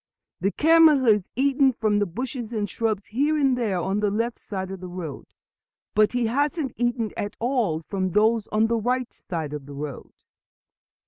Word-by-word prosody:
"The 195 Hz, +4 st, +1 dB
camel 320 Hz, -1 st, +5 dB
has 210 Hz, -5 st, +3 dB
eaten 270 Hz, 0 st, +3 dB
from 215 Hz, -3 st, 0 dB
the 205 Hz, -, +1 dB
bushes 240 Hz, -, -5 dB
and 210 Hz, -3 st, -1 dB
shrubs 215 Hz, 0 st, -2 dB
here 295 Hz, +5 st, +2 dB
and 270 Hz, -3 st, +3 dB
there 215 Hz, -7 st, -1 dB
on 195 Hz, +4 st, -1 dB
the 210 Hz, -1 st, +1 dB
left 230 Hz, +4 st, -2 dB
side 190 Hz, -2 st, -5 dB
of 195 Hz, -, -6 dB
the 185 Hz, -, -7 dB
road, 175 Hz, -6 st, -7 dB, 0.7 s
but 215 Hz, +2 st, +3 dB
he 245 Hz, -1 st, +1 dB
hasn't 285 Hz, +3 st, 0 dB
eaten 240 Hz, -2 st, -1 dB
at 205 Hz, -, -4 dB
all 225 Hz, -, 0 dB
from 190 Hz, +2 st, -2 dB
those 220 Hz, +1 st, +3 dB
on 215 Hz, +1 st, +2 dB
the 230 Hz, +1 st, +1 dB
right 245 Hz, +2 st, -1 dB
side 160 Hz, -5 st, -5 dB
of 145 Hz, -2 st, -7 dB
the 140 Hz, -, -9 dB
road." 145 Hz, -2 st, -7 dB
220 Hz, 185 wpm, -24 LUFS, 195-250 Hz, 0.7 s, camel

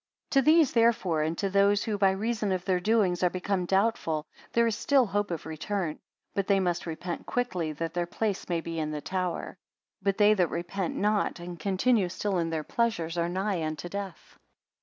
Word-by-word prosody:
74 275 Hz, -, +5 dB
To -, -, -6 dB
these 315 Hz, -6 st, +4 dB
therefore, 225 Hz, -9 st, +3 dB
and 160 Hz, +2 st, -1 dB
to 200 Hz, -, 0 dB
those 200 Hz, +1 st, +4 dB
who 215 Hz, -, -1 dB
by 195 Hz, -1 st, +4 dB
reason 215 Hz, +1 st, -1 dB
of 185 Hz, -1 st, -1 dB
their 185 Hz, -2 st, +2 dB
doings 195 Hz, -3 st, +2 dB
are 180 Hz, -, +4 dB
become 185 Hz, 0 st, -2 dB
doubtful, 190 Hz, -6 st, +1 dB, 0.3 s
there 235 Hz, 0 st, +3 dB
is 225 Hz, -2 st, +1 dB
still 275 Hz, +1 st, +3 dB
hope 205 Hz, 0 st, -1 dB
of 170 Hz, -4 st, -4 dB
return; 160 Hz, +1 st, -3 dB, 0.3 s
but 200 Hz, -1 st, -1 dB
they 200 Hz, -1 st, +4 dB
must 175 Hz, -2 st, -1 dB
repent 170 Hz, +1 st, -5 dB
quickly, 185 Hz, -10 st, -1 dB
that 165 Hz, +2 st, -4 dB
their 175 Hz, -1 st, -1 dB
place 205 Hz, +1 st, -2 dB
may 170 Hz, -2 st, 0 dB
be 165 Hz, 0 st, -4 dB
in 155 Hz, -1 st, -1 dB
the 150 Hz, -1 st, -4 dB
tower. 180 Hz, +1 st, -3 dB, 0.4 s
But 195 Hz, -1 st, 0 dB
they 210 Hz, 0 st, +6 dB
that 180 Hz, -5 st, +2 dB
repent 175 Hz, +2 st, -3 dB
not, 210 Hz, -3 st, +1 dB
and 175 Hz, 0 st, -7 dB
continue 195 Hz, +2 st, +2 dB
still 195 Hz, +1 st, -1 dB
in 165 Hz, -1 st, 0 dB
their 160 Hz, -1 st, -2 dB
pleasures, 175 Hz, -6 st, -1 dB
are 170 Hz, 0 st, 0 dB
nigh 190 Hz, 0 st, -1 dB
unto 155 Hz, +2 st, -4 dB
death. 200 Hz, -2 st, -7 dB
190 Hz, 200 wpm, -28 LUFS, 170-205 Hz, 0.4 s, they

